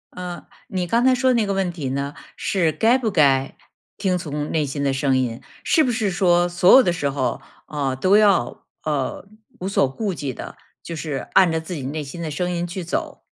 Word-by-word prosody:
呃， 180 -1 -6 0.2
你 185 -2 -2
刚 230 +7 +1
才 260 0 +5
说 260 0 +2
的 - - +3
那 225 -3 +2
个 200 - -1
问 190 -2 0
题 150 -6 -4
呢， 140 +2 -3 0.2
是 170 -5 0
该 230 +8 +3
不 235 -4 -1
该 140 -6 +2 0.4
听 185 -2 0
从 150 -3 -4
内 155 -2 +1
心 140 +1 -4
的 140 - +1
声 135 0 +1
音， 120 -2 -2 0.2
是 315 - +3
不 250 - +1
是 220 -4 0
说 175 -1 +3
所 175 +1 +4
有 265 - +9
的 175 - +1
时 145 -4 -1
候， 135 -2 -2 0.3
呃， 140 -3 -2
都 185 +10 +4
要， 200 - +2 0.2
呃， 150 +4 -2 0.3
无 185 - -4
所 195 -8 +2
顾 200 +8 -3
忌 145 -5 -4
地， - - -8 0.3
就 165 - -6
是 150 -4 -4
按 185 -3 +5
着 160 - 0
自 160 +3 -7
己 150 - -5
内 150 +3 -4
心 145 +5 -8
的 160 - -3
声 175 +4 -2
音 175 0 -2
去 180 +1 -5
走。 170 - -4
170 Hz, 240 characters per minute, -22 LUFS, 140-190 Hz, 0.4 s, 有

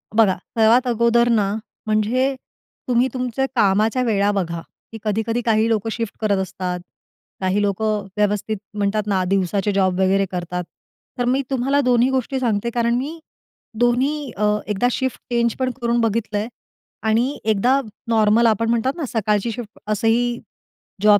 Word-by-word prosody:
बघा 210 -4 +5 0.2
सर्वात 230 +4 +5
अगोदर 235 0 +3
ना 210 -4 +2 0.3
म्हणजे 235 +6 +1 0.5
तुम्ही 250 0 +3
तुमच्या 255 0 -1
कामाच्या 215 +3 +3
वेळा 205 -3 +2
बघा, 170 -4 -2 0.3
की 225 - -7
कधी-कधी 225 +3 -1
काही 225 -1 +3
लोक 225 -1 0
शिफ्ट 230 -2 -3
करत 205 -2 +2
असतात 180 -1 -4 0.6
काही 190 +2 +1
लोक 200 0 -1
व्यवस्थित 210 0 -1 0.2
म्हणतात 205 +1 0
ना 190 -2 +1
दिवसाचे 195 +2 0
जॉब 190 -2 +1
वगैरे 195 +1 +3
करतात. 180 0 -3 0.5
तर 245 - 0
मी 260 +3 +2
तुम्हाला 270 +2 +1
दोन्ही 250 -1 +3
गोष्टी 265 0 -1
सांगते 235 -2 0
कारण 235 0 +1
मी 290 +7 -3 0.6
दोन्ही 260 +4 +1
अ, 210 - -1 0.2
एकदा 210 +3 +1
शिफ्ट 260 +1 -2
चेंज 235 -1 +1
पण 255 -1 0
करून 235 0 +1
बघितलंय 220 -1 -1 0.6
आणि 240 +6 +1
एकदा 220 +5 +3 0.3
नॉर्मल 225 0 +4
आपण 225 +1 +1
म्हणतात 235 +3 +1
ना 320 - -2
सकाळची 215 0 0
शिफ्ट 215 -2 -8
असंही 235 +3 +1 0.6
जॉब 210 -1 +6
225 Hz, 145 wpm, -21 LUFS, 205-245 Hz, 0.6 s, जॉब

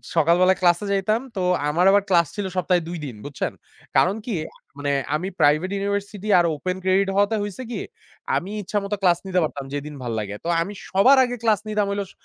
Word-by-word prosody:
সকাল 165 +1 +4
বেলায় 185 +1 +4
ক্লাসে 175 +2 +3
যাইতাম। 200 +3 +1
তো 190 - -2 0.3
আমার 170 +5 +2
আবার 200 0 +4
ক্লাস 170 -3 +4
ছিল 205 -2 -3
সপ্তাহে 180 -1 +2
২ 175 - -4
দিন, 130 -5 -7
বুঝছেন? 145 -2 -3 0.5
কারণ 190 - +4
কি 240 - -3 0.4
মানে 145 0 -1 0.2
আমি 175 +5 -2
প্রাইভেট 155 +5 +3
ইউনিভার্সিটি 200 +1 -3
আর 175 - +3
open 180 +5 -3
credit 190 +1 +2
হওয়াতে 205 +2 +3
হইছে 205 +5 -6
কি? - - -3 0.5
আমি 190 +3 -2
ইচ্ছামত 200 +1 -3
ক্লাস 175 -3 +4
নিতে 185 -1 +1
পারতাম 140 -3 -4
যেদিন 145 +1 -5
ভাল্লাগে। 110 -4 -3
তো - - -5
আমি 195 +5 -4 0.2
সবার 250 +9 +5
আগে 245 -1 -2
ক্লাস 220 -4 +3
নিতাম 210 -1 +1
হইল 200 0 -1
স - - -15
185 Hz, 195 wpm, -23 LUFS, 170-205 Hz, 0.5 s, সবার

